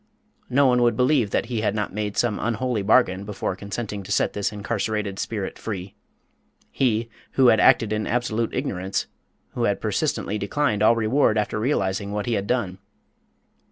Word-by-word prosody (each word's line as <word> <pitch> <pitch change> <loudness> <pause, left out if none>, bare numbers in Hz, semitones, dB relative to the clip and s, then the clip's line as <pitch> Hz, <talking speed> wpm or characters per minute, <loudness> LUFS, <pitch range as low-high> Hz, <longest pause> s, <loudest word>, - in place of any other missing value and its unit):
No 140 +3 +4
one 125 -1 +4
would 120 -1 +3
believe 125 -4 +3
that - - 0
he 115 -2 -2
had 105 -1 0
not 105 -3 -2
made 105 0 -3
some 120 -4 +1
unholy 120 0 -1
bargain 100 -2 +3
before 100 -2 -3
consenting 100 +1 -5
to 100 +1 -9
set - - +1
this 100 0 -1
incarcerated 105 -1 -3
spirit 105 -4 -4
free 95 -3 -5 0.8
he, 115 -3 +1 0.3
who 130 -2 +5
had 110 - +4
acted 115 -4 +4
in 110 0 -2
absolute 115 -1 -1
ignorance, 95 -8 -2 0.5
who - - 0
had - - 0
persistently 105 +1 -1
declined 105 0 0
all 110 +2 +5
reward 115 +1 +2
after 105 0 -1
realising 100 -5 -1
what 105 0 -2
he 120 - -1
had 100 -2 -1
done! 100 -7 -1
110 Hz, 170 wpm, -24 LUFS, 100-120 Hz, 0.8 s, who